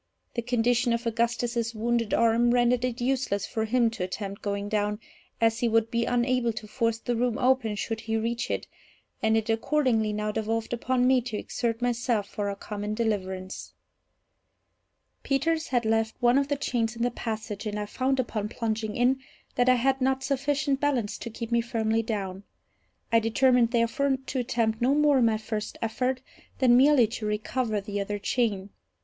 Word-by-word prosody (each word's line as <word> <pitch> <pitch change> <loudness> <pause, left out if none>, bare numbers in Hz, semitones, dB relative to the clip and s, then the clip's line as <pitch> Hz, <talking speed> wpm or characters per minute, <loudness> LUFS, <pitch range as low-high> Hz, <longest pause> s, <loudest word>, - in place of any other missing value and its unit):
The 235 - -1
condition 240 0 +1
of 235 +1 -2
Augustus's 235 0 -1
wounded 230 0 0
arm 230 +1 +3
rendered 245 0 +3
it 250 -1 -2
useless 245 -6 0
for 220 -1 -2
him 235 0 +2
to 220 -5 -4
attempt 195 +2 -5
going 200 0 -2
down, 210 0 -1 0.4
as 225 0 +2
he 240 - +1
would 225 0 +2
be 235 0 +1
unable 245 -1 +1
to 215 - -7
force 230 0 0
the 240 +1 -2
room 240 -1 0
open 250 -4 +2
should 225 +2 -3
he 225 0 -1
reach 230 +2 -2
it, - - -2 0.6
and 220 -1 +3
it 220 - -1
accordingly 225 -1 +1
now 210 0 -2
devolved 225 +1 -2
upon 250 +1 +1
me 255 0 +4
to 230 -3 -4
exert 230 +2 -2
myself 240 -3 0
for 205 0 -3
our 200 - -3
common 210 +1 -5
deliverance. 190 -4 -3 1.5
Peters 315 +4 0
had 245 -3 0
left 225 0 +1
one 245 +2 +4
of 280 - 0
the 285 - 0
chains 240 -4 -1
in 235 - -2
the 245 - +1
passage, 220 -2 -5
and 210 0 -3
I 210 - -2
found, 260 +5 -1
upon 215 -4 -2
plunging 220 -2 -2
in, 255 +2 +2 0.3
that 245 +1 +2
I 255 - +6
had 265 +2 +1
not 265 0 +1
sufficient 275 0 0
balance 265 -8 0
to 235 - -6
keep 230 +1 -7
me 235 0 +3
firmly 225 -2 0
down. 195 -4 -4 0.7
I 230 - +6
determined, 240 +1 +3
therefore, 260 +4 +1
to 260 0 -4
attempt 230 -3 0
no 260 +4 +3
more, 295 -2 +4
in 240 - +4
my 220 -1 +2
first 215 -1 -5
effort, 250 +3 -1 0.3
than 250 -3 +5
merely 265 -1 +6
to 220 -1 -4
recover 215 +1 -1
the 200 0 -4
other 205 +1 -3
chain. 205 -2 -1
230 Hz, 180 wpm, -27 LUFS, 220-250 Hz, 1.5 s, I